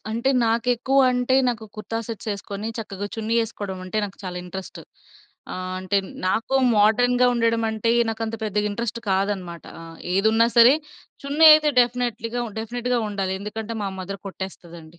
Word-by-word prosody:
అంటే 235 +4 0
నాకేక్కువంటే 250 +2 +2
నాకు 230 -2 -3
కుర్తా 220 +1 -4
సెట్స్ 225 -1 -6
ఎసుకొని, 200 +2 -6
చక్కగా 205 -2 -5
చున్నీ 225 +1 -2
ఎసుకోవడమంటే 195 -2 -5
నాకు 200 - -8
చాలా 180 -1 -5
ఇంట్రెస్ట్. 190 +1 -8 0.7
ఆ! - - -4 0.3
అంటే 185 +2 -1 0.3
నాకు 225 +7 0 0.2
మోడర్న్‌గా 245 +4 +4
ఉండడం 230 -1 +1
అంటే 220 +1 -1 0.2
నాకంత 225 0 -4
పెద్దగా 210 0 0
ఇంట్రెస్ట్ 230 +2 -4
కాదన్నమాట, 190 -3 -2 0.2
ఆహ్ 165 0 -11 0.2
ఏదున్నా 220 +4 +4
సరే 235 +3 +8 0.5
చున్నీ 295 +3 +5
అయితే 305 -1 +3
డెఫినైట్‌లీగా 240 -1 -1
ఉన్ 210 - -14
డెఫినిట్‌గా 245 +2 -2
ఉండాలి. 195 -2 -2
ఎందుకంటే 220 +2 -5
మా 200 - -1
మదర్ 195 +1 -6
కొట్టేస్తదండి. 170 -4 -9
220 Hz, 140 wpm, -23 LUFS, 195-235 Hz, 0.7 s, సరే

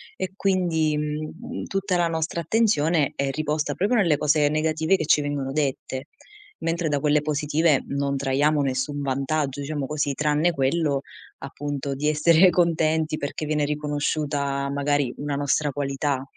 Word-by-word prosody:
e 185 - -4
quindi, 170 -6 +1
mhmm, 150 +2 -5
tutta 195 -2 -1
la 170 -1 +2
nostra 165 +2 -2
attenzione 165 - +2
è 140 -1 -1
riposta 155 +1 -1
proprio 205 +6 +1
nelle 170 -9 +3
cose 150 0 +3
negative 160 +4 +1
che - - -2
ci 150 - +4
vengono 145 -2 -3
dette. 135 -1 -2 0.5
Mentre 165 -1 -1
da 145 -1 +1
quelle 150 0 +2
positive 150 0 +1
non 140 0 -1
traiamo 145 +2 +2
nessun 145 +2 -2
vantaggio, 140 +1 -1
diciamo 145 -1 -3
così, 145 -1 -1
tranne 150 +3 +2
quello 140 0 +1 0.4
appunto 140 0 -4
di 150 +2 -1
essere 165 +4 +5
contenti, 160 -2 +1
perché 145 +2 -4
viene 150 -1 0
riconosciuta 145 -1 -1
magari 145 -2 0
una 145 0 -3
nostra 145 +1 0
qualità. 140 -1 -2
150 Hz, 145 wpm, -24 LUFS, 140-160 Hz, 0.5 s, essere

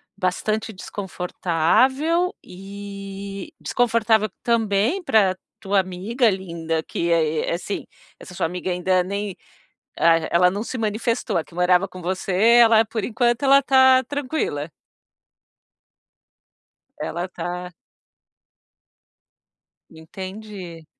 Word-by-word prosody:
bastante 215 +4 -1
desconfortável, 205 - 0
e 200 0 -8
desconfortável 225 -2 +2
também 225 - +1
pra 210 - +3 0.2
tua 200 -1 +1
amiga 195 +7 0
linda 170 -4 -3
que 170 +2 -2
é 160 -2 +1
é - - 0
Assim, 195 +3 -5 0.3
essa 180 - -11
sua 180 - 0
amiga 180 +2 -4
ainda 180 +1 +1
nem 200 +1 -4 0.6
ah, 165 0 +5
ela 180 +1 +4
não 200 +3 -3
se 250 +2 -5
manifestou, 225 +2 -1
a 165 - 0
que - - -19
morava 180 +2 +3
com 185 -1 -11
você, 185 +2 -3 0.3
ela 225 -1 +6
por 220 -1 -3
enquanto, 240 +1 0
ela 275 0 +6
tá 260 -1 +5
tranquila? 260 - -3 2.3
Ela 175 +2 -3
tá 180 0 -6 2.2
Entendi. 185 0 -9
195 Hz, 105 wpm, -22 LUFS, 180-225 Hz, 2.3 s, ela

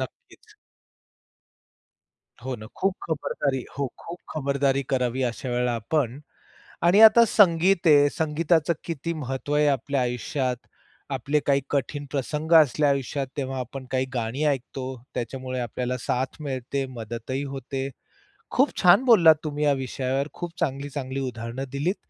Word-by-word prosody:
नक्कीच. 130 - -10 1.9
हो 130 +1 -3
ना, 110 - -10
खूप 195 0 +1
खबरदारी 140 -4 -2
हो, 140 - 0
खूप 170 +1 -8 0.2
खबरदारी 140 -2 +1
करावी 130 0 0
अशा 120 +1 -3
वेळेला 125 0 0
आपण. 125 +2 -1 0.6
आणि 175 +5 +5
आता 225 +1 +9
संगीत 185 -3 +4
आहे. 145 -1 +6
संगीताचं 160 +1 +1
किती 165 0 -4
महत्व 135 +3 -4
आहे 150 0 +4
आपल्या 140 0 0
आयुष्यात. 125 +2 -1 0.6
आपले 150 +2 0
काही 140 -1 +3
कठीण 145 +1 -2
प्रसंग 150 +3 -3
असले 150 +1 +1
आयुष्यात, 140 0 0
तेव्हा 135 -1 -3
आपण 130 +1 -6
काही 130 0 +1
गाणी 120 +4 -2
ऐकतो. 135 -2 -2 0.3
त्याच्यामुळे 130 +2 -4
आपल्याला 125 +1 -3
साथ 130 +2 -2
मिळते, 135 -1 -3
मदतही 120 +5 -4
होते. 135 +1 -4 0.6
खूप 270 +3 +3
छान 180 +7 +6
बोललात 170 -10 +7
तुम्ही 150 -1 -3
या 145 - +4
विषयावर. 135 +1 -2
खूप 175 -1 -7
चांगली, 140 -3 -2
चांगली 135 -1 -4
उदाहरणं 115 +2 -5
दिलीत. 150 +8 -1
140 Hz, 135 wpm, -25 LUFS, 130-150 Hz, 1.9 s, आता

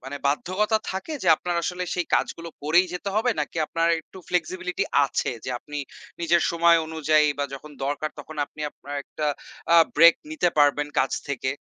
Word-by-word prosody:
মানে 135 +2 -5
বাধ্যকতা 190 +9 +1
থাকে 190 +12 -5
যে 185 - +1
আপনার 175 -1 -3
আসলে 180 +1 -2
সেই 175 -1 -1
কাজগুলো 170 0 -1
করেই 175 +5 +4
যেতে 180 +3 -4
হবে 235 +3 +2
নাকি 150 +3 -4
আপনার 165 +1 0
একটু 185 - -15
ফ্লেক্সিবিলিটী 180 +1 -1 0.2
আছে 135 - -1
যে - - -3
আপনি 145 +3 -7 0.4
নিজের 170 0 +3
সময় 170 0 +5
অনুযায়ী 155 -1 +2
বা 145 - +1
যখন 145 +3 -10
দরকার 145 +2 -2
তখন 155 +2 -9
আপনি 155 - -15
আপনার 145 +1 -9
একটা 155 - -4 0.5
আ - - +8 0.2
ব্রেক 165 +2 +8 0.2
নিতে 295 - +1
পারবেন 145 0 +4
কাজ 130 0 +2 0.2
থেকে? 130 -1 -2
165 Hz, 175 wpm, -25 LUFS, 145-180 Hz, 0.5 s, আ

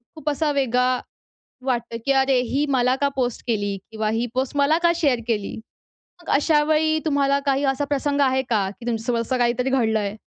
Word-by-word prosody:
खूप 310 -1 -3
असा 300 +1 0
वेगळा 255 -2 +1 0.7
वाटतं, 240 -2 -1
की 275 - +4
"अरे, 265 -1 +3
ही 265 +4 -1
मला 255 -1 +2
का 280 +1 +1
पोस्ट 245 -3 -1
केली 205 -4 -1
किंवा 220 -1 -2
ही 225 +2 -1
पोस्ट 260 +2 -2
मला 290 +3 +3
का 340 0 +4
शेअर 280 -8 +1
केली?" 210 -3 -1 0.7
मग - - -7
अशा 295 +1 +3
वेळी 315 +1 +2
तुम्हाला 280 -2 +2
काही 275 0 +1
असा 270 +1 +1
प्रसंग 285 0 -1
आहे 265 -1 +2
का, 210 -6 0
की 205 +4 -12
तुमच्या 225 -2 -2
सोबत 235 -1 0
असं 250 +3 -1
काहीतरी 245 +2 +1
घडलं 225 -4 +2
आहे? 205 +1 -3
260 Hz, 200 wpm, -22 LUFS, 235-285 Hz, 0.7 s, की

